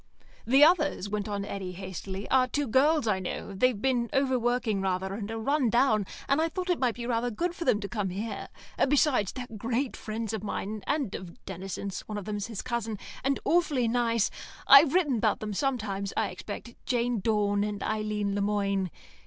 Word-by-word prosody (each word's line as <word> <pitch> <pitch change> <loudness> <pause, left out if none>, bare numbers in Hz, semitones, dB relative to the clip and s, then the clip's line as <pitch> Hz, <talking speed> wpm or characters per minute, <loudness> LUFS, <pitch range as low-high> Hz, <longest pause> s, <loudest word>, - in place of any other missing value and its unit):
"The 270 +4 +6
others," 305 - +3
went 210 0 -2
on 200 -1 -3
Eddy, 190 -3 -5
hastily, 190 +1 -6
"are 255 -1 +5
two 290 +3 -1
girls 280 +3 +3
I 200 -3 +2
know; 190 +2 -5
they've 245 +2 +2
been 245 -1 +1
over 270 -2 +2
working 235 -4 0
rather 190 0 -1
and 205 0 -5
are 225 - -3
run 270 +2 +1
down, 220 -4 +3 0.2
and 275 +3 +3
I 325 - +1
thought 365 +1 -2
it 350 - 0
might 250 -3 +1
be 240 - -5
rather 240 0 0
good 340 +10 -2
for 345 - -5
them 245 -6 +3
to 200 - -3
come 205 -3 -2
here. 200 +3 -4 0.4
Besides, 270 - +3
they're 255 - -6
great 235 +5 -1
friends 220 0 -4
of 215 -2 -3
mine, 210 0 -4
and 285 -8 0
of 175 -2 -9
Denison's 190 +1 -5
(one 210 - -4
of 205 - -5
them's 205 -2 -3
his 225 -4 -5
cousin) 225 -3 -2 0.3
and 275 +1 +1
awfully 300 -8 +2
nice. 230 -2 +1 0.4
I've 280 +3 +8
written 295 -9 +3
about - - +1
them 210 -1 -4
sometimes, 200 -6 -1
I - - +1
expect 235 - -7
Jane 245 -2 +1
Dawn 205 -1 +1
and 205 -1 -3
Eileen 210 -2 -1
Le 200 - 0
Moine. 200 -2 0
225 Hz, 195 wpm, -28 LUFS, 200-255 Hz, 0.4 s, I've